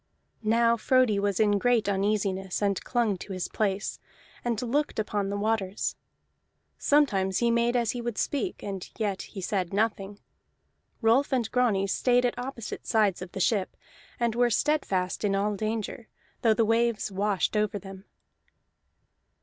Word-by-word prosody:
Now 230 Hz, +1 st, +3 dB
Frodi 250 Hz, -3 st, +3 dB
was 200 Hz, -2 st, 0 dB
in 205 Hz, -2 st, +3 dB
great 240 Hz, -1 st, +2 dB
uneasiness, 195 Hz, -1 st, 0 dB
and 200 Hz, -2 st, 0 dB
clung 230 Hz, -6 st, 0 dB
to 195 Hz, -, -7 dB
his 185 Hz, -1 st, -3 dB
place, 205 Hz, -2 st, -2 dB, 0.4 s
and 235 Hz, -3 st, -1 dB
looked 275 Hz, +5 st, -1 dB
upon 205 Hz, -2 st, -1 dB
the 200 Hz, -, -2 dB
waters. 205 Hz, -2 st, -1 dB, 0.8 s
Sometimes 195 Hz, -11 st, +2 dB
he 235 Hz, -1 st, +2 dB
made 235 Hz, +1 st, +2 dB
as 235 Hz, -2 st, +2 dB
he 245 Hz, -, -4 dB
would 235 Hz, -3 st, -4 dB
speak, 295 Hz, -, -2 dB
and 195 Hz, -3 st, -5 dB
yet 205 Hz, -4 st, -1 dB
he 195 Hz, -, -8 dB
said 185 Hz, -2 st, -1 dB
nothing. 205 Hz, -1 st, -1 dB, 0.9 s
Rolf 240 Hz, +6 st, +3 dB
and 250 Hz, -3 st, +1 dB
Grani 225 Hz, -6 st, +2 dB
stayed 245 Hz, +5 st, +2 dB
at 245 Hz, -, +1 dB
opposite 245 Hz, -2 st, -6 dB
sides 210 Hz, -5 st, +2 dB
of 185 Hz, -1 st, -8 dB
the -, -, -4 dB
ship, 195 Hz, 0 st, 0 dB, 0.4 s
and 235 Hz, -2 st, +1 dB
were 240 Hz, +1 st, +3 dB
steadfast 210 Hz, -9 st, 0 dB
in 200 Hz, -1 st, +2 dB
all 205 Hz, +1 st, 0 dB
danger, 220 Hz, +2 st, -3 dB, 0.3 s
though 225 Hz, -2 st, +4 dB
the 225 Hz, -, +3 dB
waves 230 Hz, -1 st, +1 dB
washed 200 Hz, 0 st, 0 dB
over 210 Hz, -1 st, +1 dB
them. 195 Hz, 0 st, -10 dB
215 Hz, 155 wpm, -27 LUFS, 195-235 Hz, 0.9 s, though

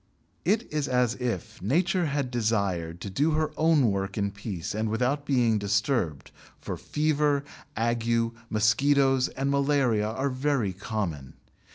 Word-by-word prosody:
It 210 Hz, +6 st, +2 dB
is 150 Hz, -2 st, 0 dB
as 125 Hz, -2 st, +2 dB
if 120 Hz, -8 st, -4 dB
Nature 175 Hz, -, +1 dB
had 140 Hz, -3 st, -2 dB
desired 100 Hz, -8 st, -1 dB
to 100 Hz, -, -5 dB
do 150 Hz, +10 st, +1 dB
her 155 Hz, 0 st, 0 dB
own 155 Hz, -8 st, +3 dB
work 100 Hz, +1 st, -3 dB
in 100 Hz, -1 st, 0 dB
peace 100 Hz, -4 st, -5 dB
and 110 Hz, +1 st, -1 dB
without 125 Hz, +6 st, 0 dB
being 120 Hz, -5 st, +3 dB
disturbed, 100 Hz, -, -1 dB, 0.3 s
for -, -, -5 dB
fever, 150 Hz, -2 st, 0 dB, 0.3 s
ague, 115 Hz, 0 st, +1 dB, 0.2 s
mosquitoes, 135 Hz, +5 st, +3 dB
and 135 Hz, +1 st, -2 dB
malaria 140 Hz, -6 st, +2 dB
are 135 Hz, +5 st, -1 dB
very 130 Hz, -6 st, 0 dB
common. 90 Hz, -, -4 dB
120 Hz, 140 wpm, -27 LUFS, 105-140 Hz, 0.3 s, own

